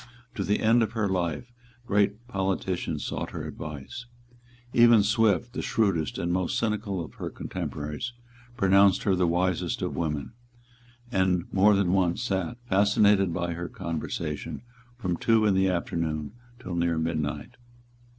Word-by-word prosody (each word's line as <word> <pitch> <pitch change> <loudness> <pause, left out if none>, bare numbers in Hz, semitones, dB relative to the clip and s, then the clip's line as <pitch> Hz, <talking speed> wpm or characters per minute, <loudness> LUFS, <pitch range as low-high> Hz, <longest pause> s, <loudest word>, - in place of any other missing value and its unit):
To 100 - -2
the 105 +2 0
end 115 +2 +4
of 110 0 0
her 110 -3 0
life 90 +4 -2 0.3
great 105 +2 +1
politicians 95 -6 -2
sought - - -3
her - - -6
advice. 75 - -7 0.7
Even 120 -3 +6
Swift, 110 +2 +2
the 130 - -3
shrewdest 95 -9 0
and 85 0 -1
most 90 -1 0
cynical 105 -5 -1
of - - -14
her - - -3
contemporaries, 75 +11 -5 0.5
pronounced 100 0 +4
her 100 - +2
the 90 -1 +2
wisest 90 +1 0
of - - -2
women, 75 - -3 0.8
and 95 -3 +1
more 100 +2 +5
than 95 -2 +2
once 95 +3 +1
sate, 95 +1 -2
fascinated 100 -1 +4
by 85 0 -2
her 85 +1 -5
conversation, 80 0 -4 0.3
from 90 -8 -2
two 115 -1 +3
in 105 - +4
the 95 0 +3
afternoon 80 -3 -2 0.3
till 95 -8 -6
near 85 -1 +1
midnight. 80 +4 -3
95 Hz, 145 wpm, -27 LUFS, 85-105 Hz, 0.8 s, Even